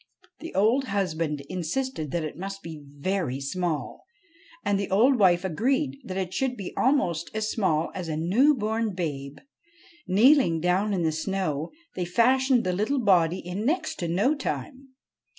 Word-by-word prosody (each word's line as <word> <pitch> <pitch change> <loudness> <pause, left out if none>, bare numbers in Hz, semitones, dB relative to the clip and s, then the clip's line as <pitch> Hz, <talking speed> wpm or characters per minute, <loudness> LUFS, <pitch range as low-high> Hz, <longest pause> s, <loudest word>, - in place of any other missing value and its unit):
The 330 - -8
old 230 +8 +3
husband 165 - -1
insisted 180 - -3
that 170 +3 -2
it 155 - -5
must 195 +3 -6
be 160 -2 -8
very 145 -1 -2
small, 155 0 -3 0.6
and 205 -1 +1
the 200 - -3
old 240 +7 +4
wife 180 -2 +4
agreed 265 - 0
that 185 -1 -6
it 185 -1 -3
should 250 +4 -1
be 195 - -6
almost 175 - +1
as 215 0 -1
small 165 -7 0
as 180 -3 -5
a 155 -1 -2
new 230 - +3
born 220 -2 -1
babe. 145 -5 -4 0.7
Kneeling 215 - +5
down 180 +5 +1
in 175 - -1
the 160 - +2
snow, 160 -2 -2 0.2
they 180 - -3
fashioned 250 +6 +3
the 185 - 0
little 215 +9 0
body 180 -6 +3
in 180 +4 -4
next 315 +7 -1
to 175 - -2
no 195 - +2
time. 275 -1 -5
190 Hz, 165 wpm, -26 LUFS, 165-235 Hz, 0.7 s, Kneeling